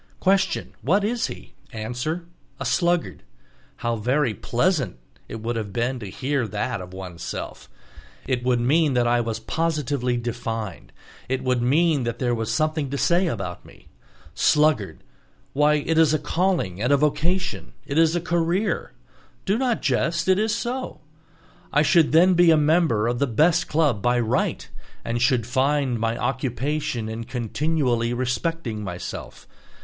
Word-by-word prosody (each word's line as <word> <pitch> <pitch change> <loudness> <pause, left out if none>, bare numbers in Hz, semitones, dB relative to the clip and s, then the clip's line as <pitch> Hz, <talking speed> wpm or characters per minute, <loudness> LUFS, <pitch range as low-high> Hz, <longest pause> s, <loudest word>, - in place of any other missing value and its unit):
Question: 195 -1 +1
What 195 +9 +2
is 230 +2 0
he? - - -10 0.2
Answer: 125 +10 -4 0.3
A 135 - -4
sluggard; 175 +6 0 0.5
how 120 -1 -2
very 125 +3 +1
pleasant 130 - 0 0.3
it 110 - -6
would 120 +1 -2
have 110 -3 -4
been 120 +4 -1
to 105 -4 -7
hear 135 +3 -1
that 105 +1 -3
of 90 0 -9
oneself! 90 -2 -7 0.6
It 125 -2 -1
would 125 -1 +2
mean 145 +3 +2
that 120 -1 +3
I 120 0 +3
was 115 -1 -3
positively 140 -2 -1
defined, 115 -4 -5 0.4
it 130 0 -1
would 125 -2 +1
mean 150 +4 +3
that 120 0 -2
there 120 -1 0
was 115 -1 -2
something 155 -2 0
to 140 - -3
say 175 +5 +2
about 100 - -4
me. - - -18 0.4
"Sluggard"—why, 150 +1 0
it 160 +2 +1
is 155 -1 +5
a - - +3
calling 165 - -1
and 125 +4 +1
vocation, 150 +6 0
it 145 +3 0
is 165 0 +4
a 175 - 0
career. 175 +3 0 0.5
Do 195 - +2
not 245 -1 0
jest, 160 +6 0
it 190 +1 +4
is 215 0 +1
so. 255 +2 -4 0.7
I 150 - +4
should 160 0 +4
then 180 +4 +6
be 175 -1 +5
a 160 - +6
member 150 -8 +2
of 120 0 -1
the 140 - +2
best 160 +9 +2
club 150 -9 +1
by 120 +3 +2
right, 115 -2 -1 0.4
and 120 0 -2
should 125 -3 +2
find 130 0 +1
my 115 +1 -1
occupation 130 0 -2
in 110 +1 -5
continually 125 0 -1
respecting 125 -2 -2
myself. 90 -2 -7
135 Hz, 155 wpm, -24 LUFS, 120-165 Hz, 0.7 s, then